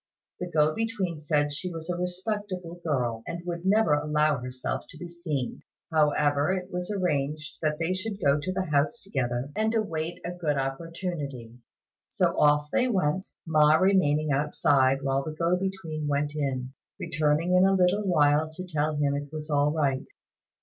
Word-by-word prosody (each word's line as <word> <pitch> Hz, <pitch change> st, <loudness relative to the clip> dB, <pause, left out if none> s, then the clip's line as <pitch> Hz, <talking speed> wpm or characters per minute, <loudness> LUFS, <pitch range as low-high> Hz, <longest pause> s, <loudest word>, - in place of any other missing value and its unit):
The 180 Hz, -, -4 dB
go 155 Hz, -2 st, +3 dB
between 200 Hz, -7 st, -2 dB
said 145 Hz, -1 st, +1 dB
she 180 Hz, +5 st, -3 dB
was 165 Hz, -1 st, -7 dB
a 180 Hz, -, -1 dB
respectable 180 Hz, -1 st, -4 dB
girl, 125 Hz, -7 st, -1 dB
and 170 Hz, 0 st, -5 dB
would 175 Hz, +1 st, -4 dB
never 210 Hz, -5 st, +4 dB
allow 150 Hz, 0 st, +2 dB
herself 125 Hz, 0 st, -4 dB
to -, -, -11 dB
be 175 Hz, -, -7 dB
seen; 165 Hz, -7 st, -4 dB, 0.3 s
however 150 Hz, 0 st, +3 dB
it 185 Hz, -1 st, -3 dB
was 180 Hz, +1 st, -3 dB
arranged 155 Hz, -6 st, -1 dB
that 155 Hz, -1 st, 0 dB
they 165 Hz, +3 st, 0 dB
should 200 Hz, +2 st, -4 dB
go 140 Hz, -4 st, +3 dB
to 165 Hz, +6 st, -3 dB
the 190 Hz, 0 st, -1 dB
house 150 Hz, +11 st, +2 dB
together, 130 Hz, -6 st, -2 dB
and 220 Hz, +1 st, +1 dB
await 170 Hz, -6 st, -2 dB
a 175 Hz, -, -2 dB
good 160 Hz, -5 st, -1 dB
opportunity. 140 Hz, -4 st, -4 dB, 0.5 s
So -, -, +1 dB
off 150 Hz, 0 st, +3 dB
they 255 Hz, -, +2 dB
went, 185 Hz, -5 st, 0 dB, 0.2 s
Ma 155 Hz, -2 st, +5 dB
remaining 155 Hz, -5 st, +3 dB
outside 135 Hz, -1 st, +2 dB
while 135 Hz, 0 st, +1 dB
the 155 Hz, +1 st, -5 dB
go 170 Hz, +2 st, +2 dB
between 180 Hz, -5 st, -3 dB
went 145 Hz, +1 st, 0 dB
in, 130 Hz, -3 st, -2 dB, 0.3 s
returning 155 Hz, +4 st, +1 dB
in 180 Hz, +1 st, +6 dB
a 195 Hz, -, +3 dB
little 185 Hz, +2 st, +3 dB
while 155 Hz, -5 st, +3 dB
to 185 Hz, +3 st, -7 dB
tell 155 Hz, -3 st, -1 dB
him 145 Hz, -1 st, +1 dB
it 145 Hz, 0 st, -4 dB
was 155 Hz, 0 st, -6 dB
all 145 Hz, 0 st, +3 dB
right. 140 Hz, -4 st, 0 dB
155 Hz, 170 wpm, -27 LUFS, 145-180 Hz, 0.5 s, in